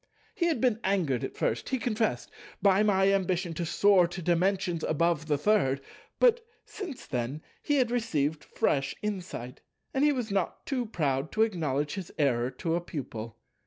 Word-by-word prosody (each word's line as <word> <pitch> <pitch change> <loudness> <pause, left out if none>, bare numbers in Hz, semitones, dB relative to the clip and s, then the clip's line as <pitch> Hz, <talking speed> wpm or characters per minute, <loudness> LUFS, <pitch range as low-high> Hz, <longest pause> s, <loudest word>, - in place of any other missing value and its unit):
He 345 -6 +1
had 320 -7 +1
been 235 -2 +2
angered 175 -11 +1
at - - -5
first—he 120 - -1
confessed—by 210 - 0
my 195 -2 +4
ambition 185 -2 0
to 170 +1 -3
soar 195 0 +5
to 175 +2 -7
Dimensions 180 0 +1
above 160 -1 +1
the 150 -2 +2
Third; 145 -6 +2 0.4
but, 480 -1 +4 0.2
since 350 -11 -7
then, 130 +3 -3 0.2
he 290 - +1
had 250 -4 +2
received 160 -11 0
fresh 135 -1 0
insight, 180 - -5 0.3
and 270 - +1
he 295 - +5
was 245 -6 -2
not 195 -3 -1
too 250 -4 -1
proud 145 -7 -1
to 220 - +4
acknowledge 150 -9 -1
his 190 -3 -6
error 125 -5 +2
to 165 +4 -3
a 170 - +1
Pupil. 115 -8 -6
180 Hz, 165 wpm, -29 LUFS, 145-215 Hz, 0.4 s, soar